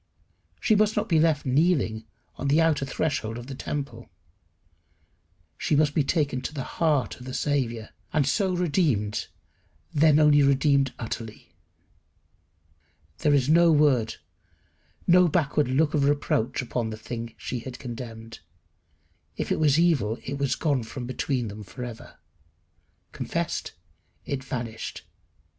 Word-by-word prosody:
She 220 Hz, -, +2 dB
must 215 Hz, +1 st, +2 dB
not 210 Hz, +1 st, +1 dB
be 165 Hz, -6 st, +3 dB
left 155 Hz, -2 st, +2 dB
kneeling 130 Hz, -6 st, +1 dB, 0.3 s
on 140 Hz, -, -4 dB
the 145 Hz, +3 st, +4 dB
outer 160 Hz, -4 st, +2 dB
threshold 130 Hz, -7 st, -2 dB
of 120 Hz, -, -8 dB
the 135 Hz, -, -7 dB
temple. 140 Hz, +1 st, -5 dB, 1.5 s
She -, -, +1 dB
must 145 Hz, 0 st, +3 dB
be 150 Hz, -, +2 dB
taken 140 Hz, -3 st, 0 dB
to 150 Hz, +4 st, -6 dB
the 135 Hz, -, -3 dB
heart 145 Hz, -10 st, 0 dB
of 125 Hz, -, -10 dB
the 130 Hz, -, -5 dB
Saviour, 120 Hz, -6 st, -1 dB, 0.2 s
and 150 Hz, -3 st, +2 dB
so 190 Hz, +7 st, +1 dB
redeemed, 145 Hz, -, 0 dB, 0.7 s
then 150 Hz, 0 st, +5 dB
only 150 Hz, -1 st, +6 dB
redeemed 140 Hz, -1 st, +3 dB
utterly. 110 Hz, -5 st, -7 dB, 1.7 s
There 145 Hz, -1 st, +3 dB
is 135 Hz, -2 st, +2 dB
no 170 Hz, +2 st, +5 dB
word, 140 Hz, -7 st, +3 dB, 0.9 s
no 180 Hz, 0 st, +6 dB
backward 150 Hz, -3 st, +1 dB
look 145 Hz, +4 st, +2 dB
of 145 Hz, -3 st, +2 dB
reproach 135 Hz, -3 st, 0 dB
upon 120 Hz, -2 st, -2 dB
the 110 Hz, -, -6 dB
thing 115 Hz, +1 st, -6 dB
she 125 Hz, -, -4 dB
had 125 Hz, +2 st, -8 dB
condemned. 115 Hz, -2 st, -8 dB, 1.0 s
If -, -, -3 dB
it -, -, +1 dB
was 150 Hz, -2 st, +4 dB
evil 140 Hz, -11 st, +2 dB
it 140 Hz, +1 st, -5 dB
was 140 Hz, -2 st, +1 dB
gone 145 Hz, -5 st, 0 dB
from 120 Hz, +3 st, -7 dB
between 130 Hz, -1 st, -2 dB
them 105 Hz, +1 st, -8 dB
for 125 Hz, +5 st, -8 dB
ever. 120 Hz, -2 st, -9 dB, 0.9 s
Confessed, -, -, -3 dB, 0.5 s
it 135 Hz, -1 st, -3 dB
vanished. 120 Hz, -4 st, -5 dB
140 Hz, 140 wpm, -26 LUFS, 120-155 Hz, 1.7 s, only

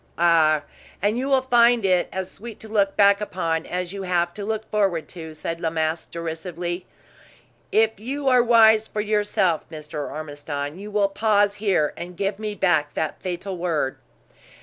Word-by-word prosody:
"Ah! 160 Hz, -3 st, +4 dB, 0.4 s
And 205 Hz, +3 st, +1 dB
you 265 Hz, -, -2 dB
will 265 Hz, -1 st, +3 dB
find 240 Hz, -3 st, +4 dB
it 180 Hz, -2 st, +2 dB
as 190 Hz, -1 st, -4 dB
sweet 230 Hz, +1 st, -10 dB
to 220 Hz, -, -8 dB
look 200 Hz, -2 st, +1 dB
back 200 Hz, 0 st, +5 dB
upon 165 Hz, -5 st, -2 dB
as 180 Hz, 0 st, -3 dB
you 200 Hz, -, -5 dB
have 175 Hz, -2 st, 0 dB
to 205 Hz, -, -6 dB
look 220 Hz, +1 st, -3 dB
forward 195 Hz, -6 st, +1 dB
to," 160 Hz, -3 st, -9 dB
said 165 Hz, +2 st, -4 dB
La 165 Hz, -, 0 dB
Masque, 160 Hz, 0 st, -2 dB
derisively. 170 Hz, +2 st, -5 dB, 0.8 s
"If 220 Hz, -1 st, +2 dB
you 275 Hz, +5 st, -4 dB
are 250 Hz, -2 st, +6 dB
wise 220 Hz, -2 st, +5 dB
for 210 Hz, -, -3 dB
yourself, 205 Hz, -5 st, 0 dB
Mr. 150 Hz, -2 st, -6 dB
Ormiston, 145 Hz, 0 st, -5 dB
you 205 Hz, +1 st, -7 dB
will 205 Hz, -1 st, +2 dB
pause 205 Hz, 0 st, +2 dB
here, 200 Hz, -7 st, +1 dB
and 175 Hz, +1 st, -8 dB
give 200 Hz, +1 st, -2 dB
me 215 Hz, -1 st, -4 dB
back 155 Hz, -7 st, +1 dB
that 160 Hz, -, -3 dB
fatal 185 Hz, +1 st, -4 dB
word." 160 Hz, -6 st, -1 dB
185 Hz, 170 wpm, -23 LUFS, 165-210 Hz, 0.8 s, are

